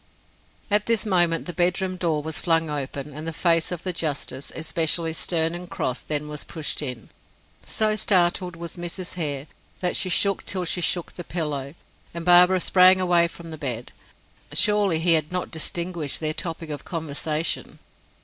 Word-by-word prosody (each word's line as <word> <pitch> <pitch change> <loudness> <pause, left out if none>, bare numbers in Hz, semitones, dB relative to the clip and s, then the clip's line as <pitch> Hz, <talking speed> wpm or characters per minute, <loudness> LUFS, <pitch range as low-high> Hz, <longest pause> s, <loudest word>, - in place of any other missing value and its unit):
At 210 0 +2
this 230 -3 +2
moment 175 -4 +2
the 175 - -5
bedroom 185 +1 +1
door 165 -5 -1
was 160 0 -2
flung 165 -2 +2
open, 140 0 -4
and 155 +3 -7
the - - -1
face 165 +1 +2
of 175 -2 -4
the 185 - -2
justice, 145 -4 -3
especially 165 0 0
stern 165 0 0
and 175 +1 -6
cross 125 -6 -2
then 150 -1 -1
was 150 -1 -4
pushed 160 -2 -4
in. 125 -6 -5 0.6
So 215 -1 +2
startled 180 -3 +2
was 170 +1 -7
Mrs. 175 +1 -5
Hare, 145 -5 -1 0.3
that 180 -1 0
she 185 - +1
shook 195 +2 +2
till 185 -2 -2
she 175 +1 -1
shook 175 0 0
the 175 - -7
pillow, 150 -4 -3 0.4
and 170 -1 -5
Barbara 180 +1 +6
sprang 185 +1 +6
away 175 -2 +4
from 165 0 -10
the 155 - -7
bed. 125 -5 -4 0.6
Surely 205 -5 +3
he 165 +1 +3
had 155 -1 0
not 180 0 -2
distinguished 170 -1 -1
their 155 -1 -1
topic 165 -1 -5
of 145 - -5
conversation! 155 -1 -2
165 Hz, 170 wpm, -24 LUFS, 155-180 Hz, 0.6 s, Barbara